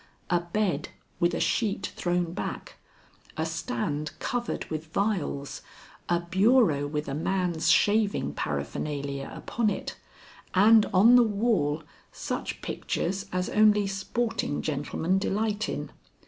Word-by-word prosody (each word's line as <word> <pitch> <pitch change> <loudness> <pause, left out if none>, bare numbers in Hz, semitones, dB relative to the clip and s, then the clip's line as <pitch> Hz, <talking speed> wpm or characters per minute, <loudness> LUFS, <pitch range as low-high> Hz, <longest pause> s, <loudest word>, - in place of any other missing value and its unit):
A 175 - +4
bed 180 +3 -1 0.3
with 175 -1 +2
a - - -2
sheet 200 -3 0
thrown 175 -1 -1
back, 200 - -5 0.6
a 160 - 0
stand 150 -2 -3
covered 245 -1 -3
with 155 0 -6
vials, 180 -8 -1 0.5
a 175 0 +3
bureau 190 - +3
with 150 +1 -3
a 135 - -3
man's 175 +1 0
shaving 205 - +3
paraphernalia 140 - -3
upon 230 -3 -1
it, 200 - -4 0.6
and 215 +3 +6
on 220 +6 +7
the - - +7
wall 205 -9 +1 0.3
such - - -4
pictures 195 +3 -2
as 180 0 -1
only 210 -1 +4
sporting 195 -3 -2
gentlemen 160 +5 -1
delight 210 +2 -1
in. - - -4
185 Hz, 120 wpm, -27 LUFS, 155-210 Hz, 0.6 s, on